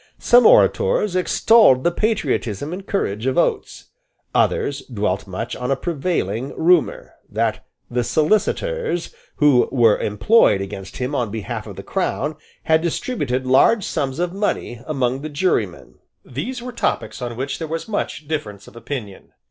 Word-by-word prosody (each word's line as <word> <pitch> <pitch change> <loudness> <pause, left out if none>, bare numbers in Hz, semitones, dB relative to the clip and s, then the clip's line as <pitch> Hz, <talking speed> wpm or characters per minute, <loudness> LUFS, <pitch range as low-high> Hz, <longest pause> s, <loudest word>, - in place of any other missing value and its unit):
Some 245 +1 +5
orators 470 - +3
extolled 185 - +4
the 175 - +2
patriotism 155 - -1
and 190 +2 -8
courage 110 - -2
of 130 - 0
Oates: - - -1 0.4
others 140 0 +1
dwelt 100 -3 -2
much 95 +5 -5
on 125 0 -4
a 135 - +2
prevailing 135 - -2
rumour, 175 0 +2 0.2
that 110 +2 -1 0.2
the 125 0 -1
solicitors 175 - 0 0.2
who 145 -4 +4
were 115 -5 +4
employed 105 - +3
against 95 -1 -7
him 130 +2 -3
on 125 -6 -1
behalf 110 -1 -5
of - - -8
the - - -8
Crown 150 +2 -2 0.3
had 160 0 +3
distributed 145 - -2
large 135 - +4
sums 140 -6 -2
of 175 +1 -1
money 195 - -2
among 130 -3 -1
the 155 - -5
jurymen. 145 - -2 0.3
These 235 - -5
were 250 - -6
topics 235 - -2
on 120 -2 -5
which 135 +2 -3
there 160 - -4
was 165 +5 -4
much 200 -8 -3
difference 105 -11 -5
of - - -15
opinion. 115 -5 -7
140 Hz, 150 wpm, -21 LUFS, 115-180 Hz, 0.4 s, Some